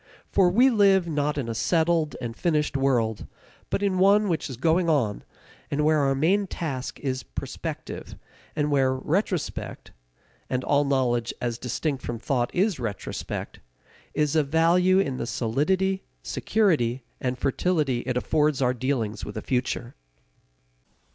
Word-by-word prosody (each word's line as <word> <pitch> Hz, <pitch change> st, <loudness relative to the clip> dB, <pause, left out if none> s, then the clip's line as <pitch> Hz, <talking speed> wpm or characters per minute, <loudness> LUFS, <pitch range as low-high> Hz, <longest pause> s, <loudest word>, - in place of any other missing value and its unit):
For 185 Hz, -2 st, +4 dB
we 245 Hz, +8 st, +5 dB
live 195 Hz, -5 st, +4 dB
not 150 Hz, -2 st, -1 dB
in 135 Hz, -5 st, -2 dB
a 115 Hz, -, -2 dB
settled 160 Hz, +3 st, +1 dB
and 120 Hz, -2 st, -5 dB
finished 150 Hz, -2 st, 0 dB
world, 120 Hz, -5 st, +1 dB, 0.4 s
but 205 Hz, -, -1 dB
in 190 Hz, -2 st, +1 dB
one 200 Hz, +2 st, +5 dB
which 165 Hz, -3 st, -1 dB
is 130 Hz, -, -7 dB
going 165 Hz, +5 st, +2 dB
on, 125 Hz, -10 st, +1 dB, 0.5 s
and 150 Hz, +1 st, 0 dB
where 155 Hz, 0 st, +4 dB
our 135 Hz, -1 st, +2 dB
main 190 Hz, +8 st, +2 dB
task 135 Hz, -8 st, -4 dB
is 130 Hz, -2 st, -2 dB
prospective, -, -, -6 dB, 0.4 s
and 150 Hz, -1 st, 0 dB
where 135 Hz, -2 st, +3 dB
retrospect 170 Hz, +4 st, -2 dB, 0.6 s
and 130 Hz, 0 st, -1 dB
all 145 Hz, 0 st, +2 dB
knowledge 125 Hz, -4 st, 0 dB
as 120 Hz, -1 st, -3 dB
distinct 135 Hz, +2 st, -2 dB
from 120 Hz, -, -4 dB
thought 120 Hz, +1 st, 0 dB
is 190 Hz, -3 st, +1 dB
retrospect 110 Hz, -5 st, -5 dB, 0.6 s
is 150 Hz, 0 st, +1 dB
of 155 Hz, -3 st, +3 dB
value 170 Hz, +4 st, +4 dB
in 140 Hz, -9 st, +1 dB
the 115 Hz, -, -3 dB
solidity, 185 Hz, +13 st, 0 dB, 0.2 s
security, 145 Hz, -, +1 dB, 0.2 s
and 125 Hz, -1 st, -2 dB
fertility 140 Hz, -1 st, 0 dB
it 125 Hz, -1 st, 0 dB
affords 150 Hz, +2 st, +1 dB
our 125 Hz, -2 st, +2 dB
dealings 120 Hz, -5 st, -2 dB
with 105 Hz, -, -6 dB
the -, -, -3 dB
future. 125 Hz, -1 st, -2 dB
145 Hz, 150 wpm, -25 LUFS, 125-175 Hz, 0.6 s, we